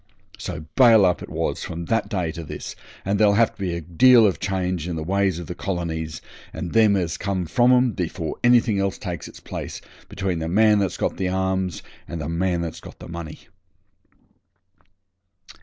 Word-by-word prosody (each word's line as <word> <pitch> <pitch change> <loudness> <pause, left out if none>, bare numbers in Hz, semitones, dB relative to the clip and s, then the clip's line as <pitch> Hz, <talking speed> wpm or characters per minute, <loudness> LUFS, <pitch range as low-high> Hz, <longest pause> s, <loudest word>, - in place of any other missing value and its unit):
So 80 - -6
'bail 115 -6 +7
up' 90 -1 +1
it - - -8
was - - -2
from 85 0 -5
that 115 +5 0
day 90 -6 -1
to 85 0 -7
this, 75 - -7 0.3
and 100 +1 0
there'll 105 -2 +5
have 115 +1 +3
to - - -30
be 90 -3 -1
a 85 - -4
deal 115 +9 +6
of 95 - +1
change 90 -3 -2
in 85 - -3
the 80 - -3
ways 95 0 +1
of 85 - -6
the 90 - -5
colonies 85 -4 -4 0.3
and 85 +2 -6
them 110 -3 +5
as 90 -2 -1
come 95 -3 -2
from 120 +10 +3
'em 125 -1 +4
before 85 -5 -4
anything 120 -4 +4
else 100 0 -1
takes 90 -5 -5
its - - -12
place, - - -6 0.3
between 95 -3 -2
the 80 0 -3
man 105 +3 +4
that's 100 -3 -1
got - - -1
the 95 -1 -1
arms 95 -1 -1 0.2
and 85 - -5
the 75 0 -4
man 85 +1 0
that's 85 -2 -5
got - - -12
the - - -11
money. 85 -2 -7
95 Hz, 195 wpm, -23 LUFS, 85-100 Hz, 0.3 s, bail